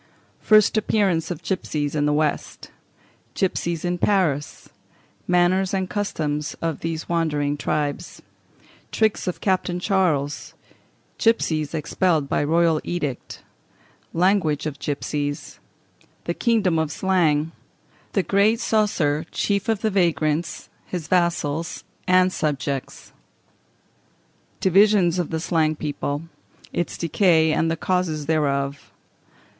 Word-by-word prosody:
First 215 Hz, 0 st, +4 dB
Appearance 200 Hz, -6 st, +1 dB
of 170 Hz, -2 st, -5 dB
Gipsies 155 Hz, -4 st, -2 dB
in 150 Hz, -1 st, +1 dB
the -, -, +2 dB
West. 150 Hz, 0 st, -2 dB, 0.6 s
Gipsies 170 Hz, -3 st, -1 dB
in 175 Hz, 0 st, -1 dB
Paris. 165 Hz, -9 st, 0 dB, 0.6 s
Manners 180 Hz, +2 st, +2 dB
and 190 Hz, -1 st, -1 dB
Customs 150 Hz, -8 st, -2 dB
of 165 Hz, -3 st, -2 dB
these 165 Hz, -1 st, -4 dB
Wandering 150 Hz, -4 st, 0 dB
Tribes. 150 Hz, +2 st, -3 dB, 0.7 s
Tricks 220 Hz, -3 st, +1 dB
of 180 Hz, -, -3 dB
Captain 185 Hz, -2 st, 0 dB
Charles. 175 Hz, -7 st, 0 dB, 0.6 s
Gipsies 160 Hz, -9 st, +1 dB
expelled 160 Hz, -1 st, 0 dB
by -, -, 0 dB
Royal 165 Hz, +1 st, +2 dB
Edict. 150 Hz, -7 st, -4 dB, 0.7 s
Language 170 Hz, -4 st, +1 dB
of 150 Hz, -2 st, -4 dB
Gipsies. 145 Hz, 0 st, -3 dB, 0.6 s
The 170 Hz, -, -2 dB
Kingdom 205 Hz, -7 st, +1 dB
of 160 Hz, -2 st, -1 dB
Slang. 165 Hz, -5 st, +1 dB, 0.6 s
The 195 Hz, -, +2 dB
Great 200 Hz, +6 st, +3 dB
Coesre, 180 Hz, -10 st, +1 dB
Chief 200 Hz, +2 st, -1 dB
of 220 Hz, -2 st, +1 dB
the 220 Hz, -, +1 dB
Vagrants; 170 Hz, -4 st, 0 dB, 0.2 s
his 175 Hz, -5 st, -5 dB
Vassals 170 Hz, -3 st, 0 dB, 0.2 s
and 185 Hz, 0 st, +4 dB
Subjects. 140 Hz, -3 st, -3 dB, 1.5 s
Divisions 190 Hz, -2 st, +4 dB
of 175 Hz, -, -1 dB
the 160 Hz, -, -2 dB
Slang 160 Hz, -2 st, +1 dB
People; 145 Hz, 0 st, -3 dB, 0.5 s
its 175 Hz, -, -2 dB
Decay 165 Hz, -2 st, +3 dB
and 165 Hz, +1 st, +1 dB
the 165 Hz, -, -1 dB
Causes 170 Hz, -4 st, -1 dB
thereof. 140 Hz, -3 st, -1 dB
165 Hz, 110 wpm, -23 LUFS, 150-185 Hz, 1.5 s, First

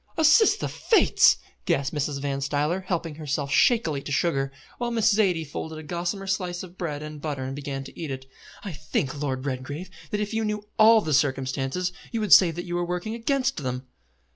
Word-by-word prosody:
"Assist 400 Hz, +7 st, +5 dB
the -, -, -1 dB
Fates!" 450 Hz, -, +4 dB, 0.3 s
gasped 140 Hz, +3 st, 0 dB
Mrs. 145 Hz, -1 st, -1 dB
Van 140 Hz, -1 st, -2 dB
Stuyler, 150 Hz, +5 st, 0 dB
helping 165 Hz, -3 st, -2 dB
herself 145 Hz, -2 st, -3 dB
shakingly 165 Hz, -, +3 dB
to 145 Hz, -, -7 dB
sugar, 135 Hz, -2 st, +1 dB, 0.3 s
while 240 Hz, 0 st, -1 dB
Miss 225 Hz, -2 st, +3 dB
Zaidie 185 Hz, -6 st, +2 dB
folded 155 Hz, +2 st, -6 dB
a 155 Hz, -, -8 dB
gossamer 175 Hz, +4 st, -3 dB
slice 185 Hz, -2 st, -2 dB
of 180 Hz, -1 st, -11 dB
bread 150 Hz, -5 st, -4 dB
and 150 Hz, -1 st, -8 dB
butter 145 Hz, -4 st, -3 dB
and 135 Hz, +1 st, -4 dB
began 140 Hz, -1 st, -5 dB
to -, -, -12 dB
eat 160 Hz, -3 st, -4 dB
it; 130 Hz, -1 st, -5 dB, 0.4 s
"I 200 Hz, -, -5 dB
think, 145 Hz, -2 st, -3 dB
Lord 130 Hz, -2 st, -2 dB
Redgrave, 145 Hz, +7 st, -4 dB, 0.2 s
that 210 Hz, -, -2 dB
if 210 Hz, +1 st, -3 dB
you 225 Hz, 0 st, 0 dB
knew 210 Hz, -1 st, -3 dB
all 220 Hz, 0 st, +7 dB
the 155 Hz, -6 st, -2 dB
circumstances, 135 Hz, +4 st, 0 dB, 0.2 s
you 230 Hz, -, -1 dB
would 210 Hz, -4 st, +4 dB
say 180 Hz, -, +8 dB
that 175 Hz, +2 st, -5 dB
you 175 Hz, -, -5 dB
were 175 Hz, 0 st, 0 dB
working 180 Hz, +5 st, -3 dB
against 265 Hz, +3 st, 0 dB
them." 130 Hz, -3 st, -3 dB
160 Hz, 200 wpm, -25 LUFS, 140-195 Hz, 0.4 s, say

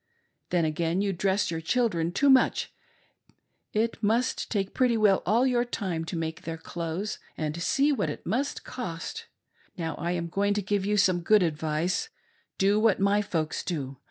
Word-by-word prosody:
Then, 175 Hz, -2 st, +2 dB
again, 165 Hz, +4 st, 0 dB
you 200 Hz, -1 st, 0 dB
dress 190 Hz, +1 st, +1 dB
your 165 Hz, -1 st, -3 dB
children 170 Hz, -4 st, +1 dB
too 275 Hz, +9 st, +4 dB
much; 260 Hz, -, +3 dB, 1.0 s
it 225 Hz, +2 st, -1 dB
must 230 Hz, +3 st, +1 dB
take 195 Hz, -3 st, -1 dB
pretty 250 Hz, -3 st, +2 dB
well 205 Hz, -3 st, +4 dB
all 230 Hz, +6 st, +4 dB
your 245 Hz, -2 st, +2 dB
time 185 Hz, -9 st, -3 dB
to 170 Hz, -, -4 dB
make 160 Hz, -1 st, -3 dB
their 165 Hz, 0 st, -5 dB
clothes; 170 Hz, +5 st, -4 dB, 0.2 s
and, 155 Hz, +1 st, -3 dB
see, 280 Hz, -, +2 dB
what 255 Hz, -, 0 dB
it 145 Hz, -, -7 dB
must 255 Hz, +9 st, -1 dB
Cost. 255 Hz, -, -6 dB, 0.5 s
Now, 165 Hz, -3 st, -3 dB
I'm 170 Hz, +1 st, -1 dB
going 200 Hz, +4 st, 0 dB
to 205 Hz, -, -1 dB
give 200 Hz, 0 st, 0 dB
you 210 Hz, 0 st, +1 dB
some 185 Hz, -3 st, +3 dB
good 210 Hz, +3 st, +4 dB
advice.. 160 Hz, -, -1 dB, 0.5 s
Do 200 Hz, +2 st, +3 dB
what 215 Hz, -3 st, +3 dB
my 200 Hz, +1 st, +3 dB
folks 160 Hz, -6 st, -2 dB
do. 140 Hz, -6 st, -4 dB
190 Hz, 170 wpm, -27 LUFS, 165-215 Hz, 1.0 s, too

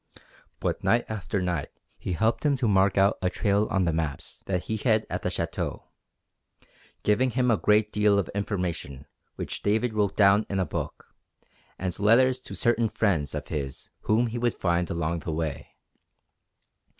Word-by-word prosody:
But -, -, -2 dB
night 120 Hz, +1 st, +3 dB
after 100 Hz, -3 st, -2 dB
night 85 Hz, -5 st, -2 dB, 0.3 s
he 90 Hz, -, -3 dB
helped 110 Hz, +7 st, +1 dB
him 145 Hz, -2 st, +3 dB
to 130 Hz, -3 st, 0 dB
mark 95 Hz, -1 st, +3 dB
out 100 Hz, +2 st, +3 dB
a 90 Hz, -, +1 dB
trail 100 Hz, +2 st, +1 dB
on 95 Hz, -1 st, +1 dB
the 85 Hz, -, +1 dB
maps 80 Hz, -4 st, -4 dB
that 90 Hz, -2 st, -1 dB
he 110 Hz, -, -2 dB
had 110 Hz, -1 st, +2 dB
at -, -, -2 dB
the -, -, -1 dB
Château, -, -, -3 dB, 1.2 s
giving 125 Hz, +5 st, +3 dB
him 125 Hz, 0 st, +1 dB
a -, -, +5 dB
great 105 Hz, 0 st, +2 dB
deal 105 Hz, -1 st, +3 dB
of 100 Hz, -, 0 dB
information 90 Hz, -, -3 dB, 0.3 s
which -, -, -5 dB
David 110 Hz, +3 st, +1 dB
wrote 105 Hz, -2 st, 0 dB
down 100 Hz, +1 st, +5 dB
in 100 Hz, -, -1 dB
a 95 Hz, -, +1 dB
book, -, -, -6 dB, 0.6 s
and 90 Hz, -2 st, -3 dB
letters 125 Hz, +5 st, +4 dB
to -, -, -8 dB
certain 120 Hz, -1 st, +2 dB
good -, -, -13 dB
friends 85 Hz, -10 st, +1 dB
of -, -, -5 dB
his 70 Hz, -3 st, -5 dB
whom 110 Hz, +3 st, +2 dB
he 120 Hz, 0 st, -3 dB
would 120 Hz, -1 st, 0 dB
find 85 Hz, -1 st, 0 dB
along 85 Hz, 0 st, -1 dB
the 80 Hz, -, -5 dB
way. 80 Hz, -2 st, -3 dB
100 Hz, 175 wpm, -26 LUFS, 85-110 Hz, 1.2 s, a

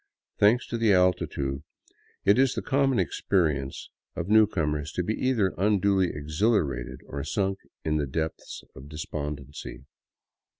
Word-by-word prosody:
Thanks 110 Hz, +5 st, +4 dB
to 115 Hz, -, -4 dB
the 110 Hz, -3 st, +4 dB
altitude, 70 Hz, -7 st, +1 dB, 0.6 s
it 100 Hz, +5 st, +5 dB
is 135 Hz, -1 st, +3 dB
the -, -, -3 dB
common 135 Hz, -1 st, +2 dB
experience 80 Hz, -7 st, 0 dB, 0.2 s
of 85 Hz, +2 st, -4 dB
new 110 Hz, 0 st, +6 dB
comers 75 Hz, -6 st, -2 dB
to 90 Hz, -, -1 dB
be 105 Hz, -, -1 dB
either 110 Hz, -7 st, +1 dB
unduly 100 Hz, -2 st, +3 dB
exhilarated 75 Hz, -, -1 dB
or 70 Hz, 0 st, -5 dB
sunk 95 Hz, +2 st, -1 dB, 0.3 s
in 75 Hz, -1 st, +1 dB
the 75 Hz, -2 st, -1 dB
depths 80 Hz, +4 st, -4 dB
of 65 Hz, +3 st, -11 dB
de 75 Hz, -, -9 dB
spondency. 75 Hz, -2 st, -6 dB
90 Hz, 140 wpm, -27 LUFS, 75-105 Hz, 0.6 s, new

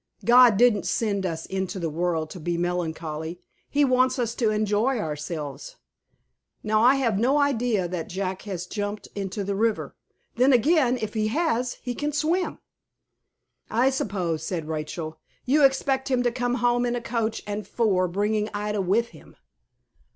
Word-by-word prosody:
God 240 Hz, -3 st, +7 dB
didn't 235 Hz, -3 st, +4 dB
send 200 Hz, -4 st, 0 dB
us 165 Hz, -1 st, -4 dB
into 190 Hz, 0 st, -3 dB
the 170 Hz, -3 st, -2 dB
world 160 Hz, 0 st, -1 dB
to 180 Hz, -, -8 dB
be 170 Hz, +1 st, -2 dB
melancholy. 165 Hz, -2 st, -3 dB, 0.3 s
He 290 Hz, 0 st, +3 dB
wants 255 Hz, 0 st, +3 dB
us 235 Hz, -2 st, -1 dB
to 235 Hz, -2 st, +1 dB
enjoy 215 Hz, +4 st, +1 dB
ourselves. 150 Hz, -4 st, -5 dB, 0.9 s
Now 215 Hz, 0 st, +2 dB
I 250 Hz, +4 st, +6 dB
have 230 Hz, -7 st, +1 dB
no 260 Hz, +6 st, +3 dB
idea 245 Hz, -9 st, +1 dB
that 175 Hz, -2 st, -5 dB
Jack 190 Hz, 0 st, -3 dB
has 185 Hz, -4 st, -5 dB
jumped 205 Hz, +2 st, -4 dB
into 200 Hz, 0 st, -4 dB
the 200 Hz, +1 st, -2 dB
river. 220 Hz, +2 st, -1 dB, 0.4 s
Then 260 Hz, +3 st, +5 dB
again, 255 Hz, 0 st, +3 dB
if 215 Hz, -1 st, -4 dB
he 215 Hz, -1 st, 0 dB
has, 250 Hz, -2 st, 0 dB
he 245 Hz, -, -3 dB
can 295 Hz, +3 st, -3 dB
swim." 325 Hz, +5 st, 0 dB, 1.1 s
"I 245 Hz, +4 st, +3 dB
suppose," 185 Hz, -, -2 dB
said 165 Hz, -2 st, -3 dB
Rachel, 155 Hz, 0 st, -5 dB, 0.3 s
"you 290 Hz, +3 st, +3 dB
expect 270 Hz, 0 st, +2 dB
him 255 Hz, -2 st, +2 dB
to 240 Hz, -, +2 dB
come 245 Hz, 0 st, -1 dB
home 245 Hz, 0 st, +2 dB
in 240 Hz, -, -1 dB
a -, -, -1 dB
coach 230 Hz, -2 st, -2 dB
and 205 Hz, -1 st, -4 dB
four, 195 Hz, -6 st, +1 dB
bringing 210 Hz, +4 st, 0 dB
Ida 210 Hz, 0 st, -1 dB
with 215 Hz, +6 st, +1 dB
him." 155 Hz, -, -17 dB
215 Hz, 165 wpm, -25 LUFS, 180-245 Hz, 1.1 s, God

